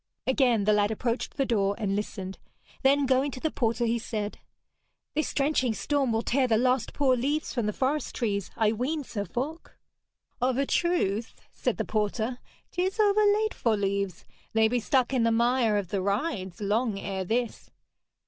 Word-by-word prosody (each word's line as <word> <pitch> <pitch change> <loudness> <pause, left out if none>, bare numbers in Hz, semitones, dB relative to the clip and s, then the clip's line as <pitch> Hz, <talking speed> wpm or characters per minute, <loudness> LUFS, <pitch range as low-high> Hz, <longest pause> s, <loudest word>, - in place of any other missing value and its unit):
Again 250 -5 +3
the 210 +1 +4
lad 205 0 +3
approached 230 +2 -2
the 275 - +2
door 200 -4 +1
and 200 -3 -1
listened; 195 -2 -4 0.4
then 280 +1 +4
going 265 +2 +2
to 255 - -7
the 315 +3 -1
porter 235 -1 0
he 235 +1 +1
said: 215 -2 -4 0.7
'This 310 - -1
drenching 275 -5 +1
storm 280 -2 0
will 225 +1 0
tear 260 +1 +2
the 225 -2 +3
last 250 0 +1
poor 270 -3 +3
leaves 285 +6 -1
from 235 -4 -1
the - - +1
forest 275 +7 -1
trees, 200 -5 -1
I 220 -2 +3
ween, 270 +7 -2
Sir 205 -5 -4
Falk.' 275 - -5 0.6
'Of 255 0 +2
a 275 - +2
truth,' 235 - 0 0.2
said - - -1
the - - -1
porter, 220 +3 -1 0.3
''tis 375 +4 -1
overlate 425 +1 +3
for 225 -3 +1
leaves. 200 -2 -2 0.3
They 220 0 +4
be 245 +2 +1
stuck 260 +2 +1
in 255 - +2
the 230 0 +3
mire 235 -1 +3
of 195 -4 -2
the 195 0 -1
rides 200 - -2
long 210 +1 0
ere 190 -1 -3
this.' 235 +5 -2
235 Hz, 175 wpm, -27 LUFS, 210-270 Hz, 0.7 s, the